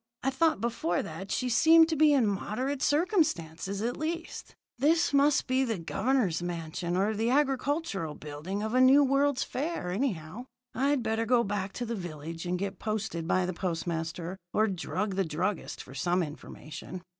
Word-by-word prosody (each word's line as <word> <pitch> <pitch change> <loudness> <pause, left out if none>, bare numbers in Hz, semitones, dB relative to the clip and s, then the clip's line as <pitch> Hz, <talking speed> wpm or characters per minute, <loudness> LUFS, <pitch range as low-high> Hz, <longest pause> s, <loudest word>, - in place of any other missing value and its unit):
I 270 - +1
thought 320 +1 +2
before 225 -7 -1
that 180 +5 -7
she 255 - -1
seemed 320 +7 +6
to 320 - 0
be 305 0 +5
in 270 -5 +4
moderate 250 +7 -2
circumstances, 210 - 0
at 240 +2 -1
least. 330 +2 -5 0.2
This 315 +3 +3
must 285 +1 +4
be 260 +1 +2
the 230 -5 -1
Governor's 195 0 0
mansion, 175 0 -3
or 205 +3 +2
the 225 +2 0
Agricultural 270 - 0
Building 155 +8 -5
of 220 +1 -3
a 255 - +4
new 270 +3 +7
World's 275 0 +2
Fair, 275 - -3
anyhow. 205 - -3 0.3
I'd 275 +1 +1
better 225 +1 -1
go 240 0 +4
back 200 -2 -2
to 245 - -4
the 235 - -3
village 165 -3 -6
and 180 +1 0
get 195 0 -4
posted 215 -6 -3
by 185 +1 +2
the 185 - -2
postmaster, 170 0 -3
or 215 - +3
drug 195 +1 -2
the 195 - +3
druggist 175 +4 -3
for 130 - -13
some 175 +7 +1
information. 155 +3 -8
210 Hz, 170 wpm, -29 LUFS, 175-265 Hz, 0.3 s, new